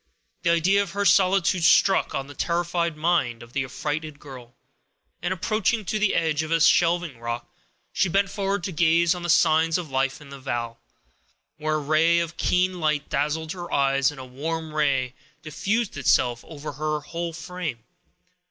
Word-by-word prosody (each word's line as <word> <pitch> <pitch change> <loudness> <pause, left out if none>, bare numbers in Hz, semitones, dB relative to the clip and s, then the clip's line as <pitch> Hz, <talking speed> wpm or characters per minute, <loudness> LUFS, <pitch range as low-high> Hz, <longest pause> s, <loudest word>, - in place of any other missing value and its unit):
The 170 - +1
idea 175 +4 +3
of 195 -3 -5
her 200 0 -1
solitude 185 -1 +3
struck 195 +4 +4
on 135 - -2
the 145 - -11
terrified 170 0 -1
mind 155 -8 0
of 120 +1 -16
the 135 - 0
affrighted 150 +3 -4
girl, 125 -5 -12 0.7
and 175 +2 -2
approaching 215 +3 0
to 215 +4 -1
the 210 -2 +2
edge 155 -2 +1
of 155 - -5
a 165 0 +2
shelving 165 -4 +3
rock, 120 0 -4 0.5
she 190 - +1
bent 195 +2 +1
forward 195 -2 -2
to 190 - -3
gaze 170 +1 +3
on 180 - -7
the 175 - -4
signs 160 0 +4
of 170 -5 -6
life 135 0 0
in 145 -2 -14
the 140 0 -10
vale, 120 -3 -4 0.8
when 155 0 -1
a - - +2
ray 155 +3 +3
of 170 -1 -2
keen 180 0 +1
light 150 -3 0
dazzled 155 +2 -1
her 175 -2 -7
eyes, 135 0 +2
and 145 -2 -9
a 130 - -7
warm 155 +5 -5
ray 135 -4 +1 0.3
diffused 205 +8 -2
itself 120 -3 +2
over 150 -2 -7
her 150 +1 -2
whole 170 +3 -5
frame. 160 -6 -6
160 Hz, 180 wpm, -24 LUFS, 140-175 Hz, 0.8 s, struck